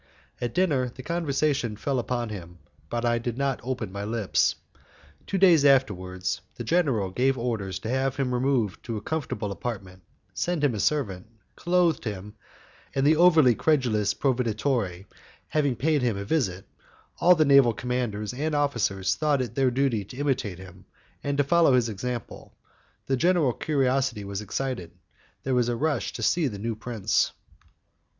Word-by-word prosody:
At 120 -2 -3
dinner 145 -9 +2
the 130 +2 -11
conversation 145 -7 0
fell 130 +5 -1
upon 120 -1 -2
him, 90 -4 -8 0.3
but 120 0 -2
I 120 0 +2
did 120 0 -4
not 140 -1 0
open 120 -5 -4
my 100 +1 -5
lips. 110 -1 +1 0.7
Two 195 - -1
days 175 -6 +6
afterwards, 95 -10 +1
the - - -6
general 135 - +1
gave 130 +6 +1
orders 110 -6 -2
to 110 - -5
have 130 +1 0
him 130 -2 -1
removed 125 -5 0
to 115 -2 -3
a - - -5
comfortable 130 -6 -3
apartment, 95 -4 -6 0.3
sent 175 -4 -1
him 140 -4 +3
a 105 - -4
servant, 100 -10 -1 0.3
clothed 175 -2 +1
him, 105 -1 -5 0.6
and 135 0 +1
the 155 +2 +5
over 160 -6 +6
credulous 115 -8 +1
proveditore 115 -7 -1 0.4
having 145 -4 +1
paid 150 +3 +1
him 120 -5 0
a 100 - -5
visit, 100 - -1 0.5
all 180 +1 +6
the 155 -2 +3
naval 140 -4 +6
commanders 115 -2 -3
and 150 +4 -2
officers 115 -10 +1
thought 150 -3 +1
it 125 -2 -3
their 135 0 +2
duty 125 -4 0
to 125 - -11
imitate 130 -10 -1
him, 95 -1 -13 0.4
and 140 0 -1
to 145 - +4
follow 165 0 +4
his 120 -2 +2
example: 120 +2 -6 0.5
the 135 - +1
general 165 -3 +2
curiosity 130 -6 0
was 100 0 -5
excited, 105 -4 -4 0.5
there 130 - -1
was 120 -1 +2
a 120 - 0
rush 145 0 -1
to 115 - -5
see 165 +5 +2
the 105 -5 -5
new 115 +3 -3
prince. 110 -3 0
125 Hz, 165 wpm, -26 LUFS, 105-140 Hz, 0.7 s, days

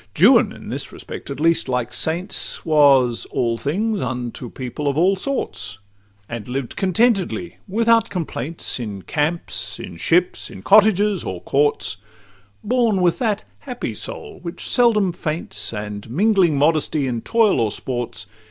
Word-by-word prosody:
Juan—in - - +4
this - - -3
respect, - - -9
at 140 -1 -5
least, 165 -1 +2
like 125 -1 -1
saints— 165 +8 -2
Was 140 -6 +4
all 115 -1 -1
things 205 +8 -1
unto 125 -1 -4
people 130 +4 -5
of 140 0 0
all 185 +4 +4
sorts, 195 - -2 0.5
And 115 -3 -6
lived 125 0 -4
contentedly, 190 -2 +1
without 230 +3 +3
complaints, 160 -5 -4
In 105 -5 -6
camps, 160 +3 -2
in 90 -2 -8
ships, 175 - +1
in - - -11
cottages, 205 -1 +4
or 90 -2 -4
courts— 145 -5 +1 0.7
Born 230 -3 +2
with 175 -2 +2
that 215 -5 0 0.2
happy 250 -3 -5
soul 430 -2 -5
which 170 -1 -5
seldom 215 -7 +3
faints, 160 -1 -2
And 105 -1 -6
mingling 185 - +3
modestly 150 0 +2
in 120 -3 -2
toils 225 - +3
or 115 -2 +2
sports. 120 -3 -4
160 Hz, 140 wpm, -21 LUFS, 125-200 Hz, 0.7 s, Juan—in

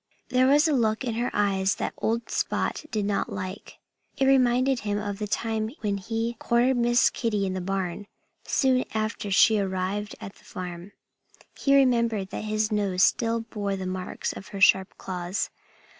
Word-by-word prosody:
There 255 0 +3
was 295 +4 +5
a 310 - +2
look 220 -4 +1
in 240 -3 -2
her 240 +2 -1
eyes 195 -2 +1
that - - -3
old 230 +1 -2
Spot - - -1
did 215 -4 -1
not 200 0 -1
like. 190 +1 -6 0.4
It 270 - +2
reminded 255 0 +3
him 205 -2 -2
of 205 -1 -4
the 210 - -3
time 220 +1 -1
when 205 -2 -1
he 225 +4 -3
cornered 245 +2 +2
Miss 240 0 +4
Kitty 210 -4 -1
in 190 - -2
the 185 - -3
barn, 190 +1 -3 0.4
soon 260 -2 +2
after 215 -1 -2
she 215 +2 +5
arrived 195 +2 -2
at 205 -3 -8
the - - -22
farm. 180 +1 -8 0.6
He 275 0 +2
remembered 235 -7 +2
that - - -5
his 215 +1 0
nose 195 -3 +1
still 230 -1 +2
bore 205 -3 -3
the 190 -1 -5
marks 185 0 -4
of - - -10
her 200 - -7
sharp 190 -1 +4
claws. 180 +1 -3
215 Hz, 175 wpm, -26 LUFS, 195-235 Hz, 0.6 s, was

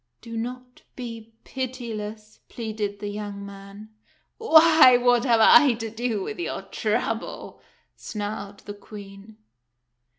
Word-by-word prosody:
"Do 230 -1 -9
not 250 +2 -6
be 230 -3 -8
pitiless," 220 -5 -6
pleaded 215 -3 -4
the 205 - -6
young 205 -1 -6
man. 200 +2 -11 0.2
" - - -42
Why, 315 - +7
what 245 0 +3
have 230 -3 +3
I 285 +3 +7
to 225 -1 -6
do 225 -3 -2
with - - -6
your 345 - -4
trouble? - - -3 0.2
" - - -41
snarled 205 -1 -6
the 205 - -8
Queen. 205 +1 -12
220 Hz, 130 wpm, -24 LUFS, 205-245 Hz, 0.2 s, Why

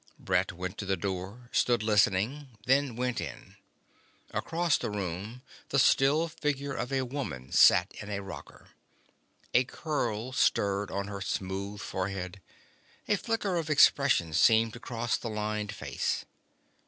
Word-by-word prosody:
Brett 95 0 0
went 90 +1 -6
to 100 - -3
the 95 0 +1
door, 100 +6 -5
stood 120 -3 +2
listening, 110 +5 +1
then 130 -1 +2
went 125 -1 -1
in. - - -8 0.8
Across 170 -2 0
the - - -3
room 105 +5 -5 0.3
the 140 - +1
still 140 +5 +4
figure 140 -3 -2
of 125 +2 -4
a 135 -1 +1
woman 100 - -5
sat 90 +1 +6
in 105 - -8
a 100 -1 -3
rocker. 95 - -10 0.8
A 125 - +5
curl 125 -5 -3
stirred 100 -5 +1
on 100 +1 -3
her 100 -1 -6
smooth 95 +1 -3
forehead. 95 0 -4 0.7
A 210 - +3
flicker 205 -3 -1
of 160 -2 -2
expression 140 - +4
seemed 110 +6 +4
to 120 - -8
cross 120 -1 -2
the 115 - -5
lined 105 -1 -2
face. 105 - -2
110 Hz, 140 wpm, -29 LUFS, 100-135 Hz, 0.8 s, sat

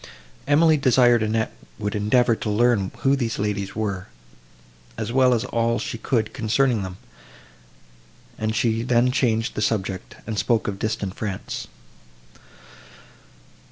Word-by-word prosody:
Emily 155 +2 +5
desired 125 -3 +4
Annette 110 +1 0 0.2
would 105 -1 -3
endeavour 115 +3 +3
to 110 - -4
learn 105 -2 +2
who 135 +1 +4
these 120 -4 -2
ladies 100 -1 -2
were, 100 -4 -3 0.9
as - - -3
well 130 0 +4
as 120 0 +1
all 115 -1 0
she 115 - -4
could 110 -4 -1
concerning 120 0 +1
them; 95 -1 -6 1.4
and 110 0 -2
she 115 -1 +1
then 125 +1 +2
changed 120 -3 +1
the - - -3
subject, 95 -4 -2
and 110 -2 -3
spoke 115 +2 +1
of 100 -1 -3
distant 105 -3 -2
France. 100 -3 -5
115 Hz, 130 wpm, -23 LUFS, 105-125 Hz, 1.4 s, Emily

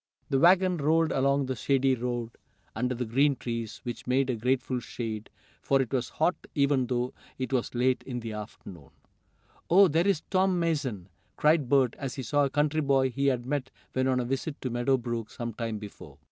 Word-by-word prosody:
The 135 - +3
wagon 180 +2 +5
rolled 160 +2 +2
along 140 +1 +2
the 130 0 -2
shady 135 +2 +2
road, 120 -1 -3 0.4
under 125 +3 -1
the 125 +1 -2
green 135 +5 +3
trees, 115 -3 -5
which 120 0 -6
made 130 +1 +2
a - - -1
grateful 125 +2 0
shade, 110 -3 -5 0.3
for 135 - +2
it 130 -1 -1
was 130 -2 0
hot 165 +3 +1 0.2
even 140 -3 +2
though 125 0 -1 0.2
it 130 +1 -3
was 125 -1 -1
late 125 +1 +2
in 125 -2 -4
the 115 -1 -5
afternoon. 100 -7 -9 0.8
"Oh, 195 +3 +7
there 165 +3 +2
is 195 -6 +1
Tom 190 -1 +2
Mason!" 145 - -1 0.3
cried 150 -4 +3
Bert, 130 -4 +3
as 135 -3 -4
he 135 - -5
saw 145 +5 +2
a - - -1
country 150 +2 +1
boy 135 -2 +2
he 140 +3 0
had 125 -3 +1
met 135 -1 -2 0.2
when 130 0 +1
on 130 -1 +2
a 125 - -1
visit 135 +4 -3
to 130 - -2
Meadow 120 +3 +2
Brook 120 -2 -4
some 120 -1 -5
time 115 -1 -3
before. 105 -1 -11
130 Hz, 200 wpm, -28 LUFS, 120-145 Hz, 0.8 s, Oh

